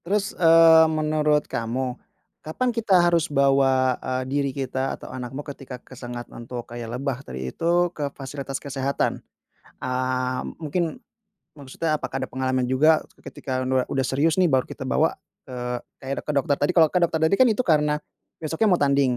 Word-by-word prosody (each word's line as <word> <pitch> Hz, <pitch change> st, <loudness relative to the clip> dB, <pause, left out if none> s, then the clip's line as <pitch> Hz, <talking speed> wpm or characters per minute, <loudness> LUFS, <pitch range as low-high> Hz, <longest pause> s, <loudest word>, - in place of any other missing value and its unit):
Terus 200 Hz, +3 st, 0 dB
eee, 165 Hz, -1 st, +7 dB
menurut 155 Hz, -1 st, +1 dB
kamu. 125 Hz, +3 st, -3 dB, 0.5 s
Kapan 245 Hz, +11 st, -2 dB
kita 220 Hz, -5 st, +3 dB
harus 170 Hz, -1 st, +2 dB
bawa, 135 Hz, -2 st, +3 dB
eee, 130 Hz, 0 st, -2 dB
diri 140 Hz, +1 st, -1 dB
kita 135 Hz, 0 st, -3 dB
atau -, -, -10 dB
anakmu 130 Hz, +3 st, -6 dB
ketika 135 Hz, -3 st, -8 dB
kesengat 120 Hz, -1 st, -8 dB
untuk 120 Hz, 0 st, -7 dB
kayak 120 Hz, -1 st, -6 dB
lebah 135 Hz, -1 st, -3 dB
tadi 65 Hz, -, -6 dB
itu 175 Hz, +1 st, +1 dB
ke 145 Hz, -3 st, -3 dB
fasilitas 135 Hz, 0 st, -5 dB
kesehatan? 140 Hz, 0 st, -2 dB, 0.6 s
Eee, 130 Hz, 0 st, -1 dB, 0.2 s
mungkin, 160 Hz, +1 st, -2 dB, 0.6 s
maksudnya 155 Hz, +3 st, -2 dB
apakah 135 Hz, -2 st, -5 dB
ada 130 Hz, -, -3 dB
pengalaman 130 Hz, -1 st, -1 dB
juga 155 Hz, +5 st, +4 dB, 0.2 s
ketika 130 Hz, -2 st, -4 dB
nua 130 Hz, 0 st, 0 dB
udah 135 Hz, -1 st, 0 dB
serius 145 Hz, +5 st, +1 dB
nih 185 Hz, -, +4 dB
baru 135 Hz, -6 st, +2 dB
kita -, -, -7 dB
bawa 155 Hz, +4 st, +1 dB, 0.3 s
ke, 130 Hz, -, -7 dB
eee, 125 Hz, 0 st, -3 dB, 0.3 s
kayak 135 Hz, +1 st, -3 dB
ke -, -, +1 dB
dokter 140 Hz, +1 st, +2 dB
tadi. 145 Hz, +5 st, +2 dB
Kalau 160 Hz, -2 st, +7 dB
ke 180 Hz, -, +3 dB
dokter 170 Hz, -2 st, +1 dB
tadi 160 Hz, -, +2 dB
kan 260 Hz, -, +7 dB
itu 225 Hz, +2 st, +1 dB
karena 150 Hz, -4 st, +2 dB, 0.4 s
besoknya 160 Hz, +7 st, 0 dB
mau 180 Hz, -, +4 dB
tanding, 140 Hz, -3 st, +2 dB
140 Hz, 170 wpm, -24 LUFS, 130-160 Hz, 0.6 s, eee